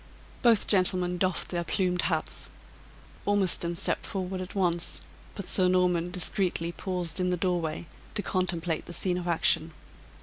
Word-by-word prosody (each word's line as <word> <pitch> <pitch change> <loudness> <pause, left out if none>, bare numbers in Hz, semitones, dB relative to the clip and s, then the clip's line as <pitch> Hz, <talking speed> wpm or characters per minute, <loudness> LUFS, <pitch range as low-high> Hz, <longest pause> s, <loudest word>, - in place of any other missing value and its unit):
Both 230 -4 +5
gentlemen 180 -2 +2
doffed 185 0 0
their 175 -1 -1
plumed 180 0 0
hats. 160 -3 -1 0.7
Ormiston 190 -4 +2
stepped 185 - -1
forward 185 -1 -3
at 185 +2 -7
once; 175 -3 +1 0.4
but 200 - -6
Sir 185 -2 +4
Norman 180 -1 +2
discreetly 180 -1 0
paused 180 -1 -3
in 180 0 +1
the 180 - 0
doorway 170 -3 -1 0.3
to 205 - 0
contemplate 175 -3 -1
the 175 - -7
scene 180 0 +1
of 175 - -6
action. 165 -1 +2
180 Hz, 145 wpm, -28 LUFS, 170-185 Hz, 0.7 s, Both